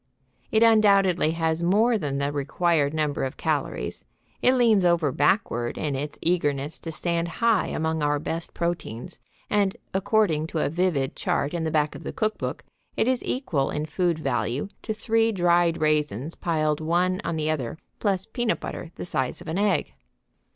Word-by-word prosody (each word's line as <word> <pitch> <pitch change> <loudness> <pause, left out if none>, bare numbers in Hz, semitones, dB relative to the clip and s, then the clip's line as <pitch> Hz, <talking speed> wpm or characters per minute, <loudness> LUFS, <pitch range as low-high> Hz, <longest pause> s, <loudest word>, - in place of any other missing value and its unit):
It 220 +1 +4
undoubtedly 200 -7 +5
has 165 0 0
more 215 +7 +3
than 145 -9 -2
the 140 +1 0
required 145 +1 +1
number 150 -2 -1
of 130 - -3
calories; - - -2 0.3
it 255 - +4
leans 225 -6 +4
over 170 -5 +3
backward 130 - +1
in 145 -3 -1
its 145 +2 -4
eagerness 150 -4 0
to 165 - -6
stand 170 +1 -1
high 225 +4 +2
among 160 0 -1
our 145 0 +2
best 165 +3 -5
proteins, 170 -9 -4 0.3
and, 200 -2 +1 0.2
according 190 -5 +2
to 160 - -5
a 155 - +1
vivid 165 -5 0
chart 140 - -1
in 170 -2 -1
the - - 0
back 150 -1 +1
of - - -9
the - - -5
cookbook, 215 -1 -2 0.3
it - - +2
is 255 -1 +1
equal 160 - -1
in 150 +1 -2
food 170 +1 0
value 135 +2 -1
to 220 - -4
three 225 +1 +1
dried 175 -3 +2
raisins 150 -2 0
piled 155 -3 0
one 180 +4 +1
on 165 - -2
the 155 0 0
other 140 -2 -3 0.2
plus 195 -3 0
peanut 240 -1 -1
butter 170 - -6
the - - -6
size 130 -7 -2
of 175 - -11
an 160 +4 -1
egg. 205 0 +1
165 Hz, 170 wpm, -25 LUFS, 150-195 Hz, 0.3 s, undoubtedly